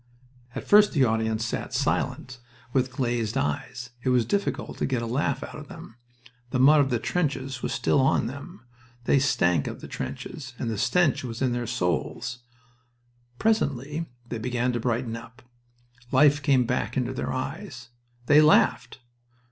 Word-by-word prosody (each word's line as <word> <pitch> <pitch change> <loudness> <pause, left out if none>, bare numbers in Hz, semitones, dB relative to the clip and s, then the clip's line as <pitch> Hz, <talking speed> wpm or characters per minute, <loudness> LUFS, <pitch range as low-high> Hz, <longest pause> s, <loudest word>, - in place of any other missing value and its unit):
At - - -5
first 210 0 +6
the 140 -5 +3
audience 110 0 0
sat 115 - -4
silent, 130 -2 -1 0.3
with 130 -1 +1
glazed 120 -4 -1
eyes. 125 - -3
It 130 - -1
was 125 -2 +3
difficult 200 - -2
to - - 0
get 125 -3 -1
a - - -2
laugh 135 +3 -1
out - - -8
of 150 - -10
them. 165 -9 -11 0.5
The 125 - -1
mud 145 +4 +6
of 140 -2 +3
the 120 - +1
trenches 135 -3 -2
was - - -2
still - - +1
on 130 -3 +3
them. 140 - -8 0.4
They 140 - +3
stank 90 - +2
of - - -6
the - - -9
trenches, 130 -5 -6
and 115 - -3
the 110 - -3
stench 140 +6 +2
was 115 -3 -5
in 130 -2 +1
their 120 -1 -3
souls. 115 +3 -2 1.0
Presently 150 - 0 0.2
they 120 -2 -4
began 125 +1 -1
to 120 - -1
brighten 115 0 -1
up. 115 +2 -11 0.7
Life 145 +2 +5
came 135 -4 +3
back 125 +3 -2
into 125 0 -1
their - - -3
eyes. 130 - -5 0.4
They 145 +4 +6
laughed!... 125 -4 +3
125 Hz, 165 wpm, -26 LUFS, 120-140 Hz, 1.0 s, first